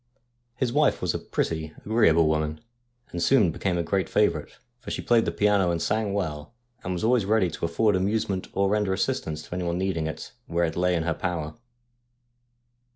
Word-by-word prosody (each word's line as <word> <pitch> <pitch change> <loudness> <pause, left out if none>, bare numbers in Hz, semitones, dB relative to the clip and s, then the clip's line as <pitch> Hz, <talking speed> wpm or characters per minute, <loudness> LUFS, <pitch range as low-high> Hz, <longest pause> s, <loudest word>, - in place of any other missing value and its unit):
His 120 -2 -1
wife 150 0 +3
was - - -1
a - - -2
pretty, 80 -1 -3
agreeable 100 -7 +4
woman, 75 0 0 0.5
and 85 - -4
soon 105 -1 +4
became 90 +2 -1
a 85 - 0
great 95 +3 -1
favourite, 85 -8 0 0.2
for - - -9
she - - -3
played 115 -2 +3
the - - 0
piano 100 -3 +2
and 85 -1 0
sang 105 +3 0
well, 80 -1 -4 0.3
and 90 - -3
was 90 - -4
always 120 0 +3
ready 100 -4 +2
to 85 - -3
afford 105 +5 +2
amusement 95 0 -1
or 100 0 +2
render 105 -1 +1
assistance 80 -4 -2
to - - -9
anyone 90 -1 -2
needing 90 -4 -1
it, 80 - -6 0.2
where 85 +1 +1
it 80 - -3
lay 90 0 +2
in 80 - 0
her 85 0 0
power. 80 -2 -3
90 Hz, 190 wpm, -26 LUFS, 80-105 Hz, 0.5 s, agreeable